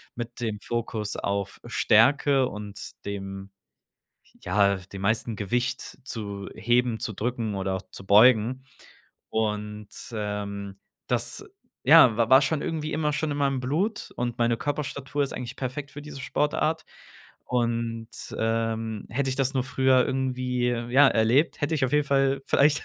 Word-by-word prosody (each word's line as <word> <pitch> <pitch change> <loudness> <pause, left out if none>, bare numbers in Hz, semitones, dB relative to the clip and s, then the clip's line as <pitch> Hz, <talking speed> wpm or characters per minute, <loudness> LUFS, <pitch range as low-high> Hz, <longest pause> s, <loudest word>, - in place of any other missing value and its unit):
mit 120 0 -6
dem 110 -3 -3
Fokus 115 -3 -3
auf 100 -1 -2
Stärke 135 +4 +4
und 105 -2 -7
dem 95 -1 -6 0.9
ja, 100 -1 +3
dem 95 +1 -10
meisten 110 +2 +1
Gewicht 120 +5 -2
zu 100 -5 -5
heben, 120 +1 +1
zu 110 - -3
drücken 115 -1 -2
oder 95 0 -1
auch 95 - -4
zu 95 - -10
beugen. 115 +4 +5 0.7
Und, 105 -1 -2 0.2
ähm, 100 -2 -4 0.3
das, - - -1 0.4
ja, 115 -4 +7
wa 115 0 +1
war 130 +1 +9
schon 145 +1 0
irgendwie 155 -1 -3
immer 150 -1 0
schon 155 0 -1
in - - -3
meinem 135 -2 +1
Blut, 175 - -1
und 120 0 -2
meine 120 0 +2
Körperstatur 145 0 -2
ist - - -5
eigentlich 125 -2 -6
perfekt 140 +2 -4
für 145 - -9
diese 145 -2 -9
Sportart. 155 +3 0 0.6
Und, 115 -2 -1 0.3
ähm, 115 -1 -1
hätte 135 +3 -1
ich 130 - 0
das 135 0 0
nur 130 -1 +1
früher 130 -1 +3
irgendwie, 125 -2 -1
ja, 120 +4 +4
erlebt, 120 +10 +2
hätte 150 +2 0
ich 135 - +1
auf 130 - -2
jeden 150 0 +3
Fall 135 0 +2
vielleicht 145 0 +3
120 Hz, 150 wpm, -26 LUFS, 105-135 Hz, 0.9 s, war